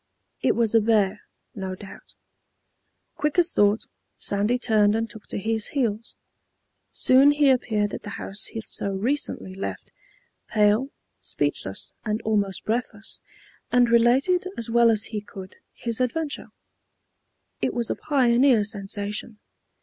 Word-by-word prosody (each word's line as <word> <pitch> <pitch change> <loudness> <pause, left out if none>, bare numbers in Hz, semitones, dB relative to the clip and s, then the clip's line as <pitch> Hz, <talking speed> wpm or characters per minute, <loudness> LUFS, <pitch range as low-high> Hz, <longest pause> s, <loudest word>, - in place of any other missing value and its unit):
It - - +2
was 230 -2 +1
a 225 - +5
bear, 210 -2 +2 0.3
no 190 -2 -5
doubt. 195 +1 -13 1.0
Quick 300 +2 -1
as 350 -1 +4
thought, 205 +1 +2 0.3
Sandy 205 +5 0
turned 215 -4 +3
and 225 0 -1
took 220 -1 -10
to - - -5
his 220 +1 -1
heels. 230 -3 -1 0.8
Soon 265 +2 +5
he 290 -1 +4
appeared 215 -5 0
at - - -5
the - - -8
house 195 +1 -2
he 225 - -5
so 200 - -3
recently 200 -1 -2
left, 195 - -6 0.6
pale, 215 +4 +2 0.3
speechless - - -3
and 215 -1 -1
almost 205 -3 -1
breathless, 220 -1 -3 0.5
and 245 -1 +4
related, 265 +11 +3
as 230 0 -4
well 235 0 +5
as 215 -2 +2
he 210 - -2
could, 190 -2 -11
his 235 +1 -3
adventure. 290 +4 -2 1.1
It - - +1
was 235 -2 -1
a - - -1
pioneer 250 -4 +3
sensation. 205 +1 -4
225 Hz, 135 wpm, -24 LUFS, 205-245 Hz, 1.1 s, a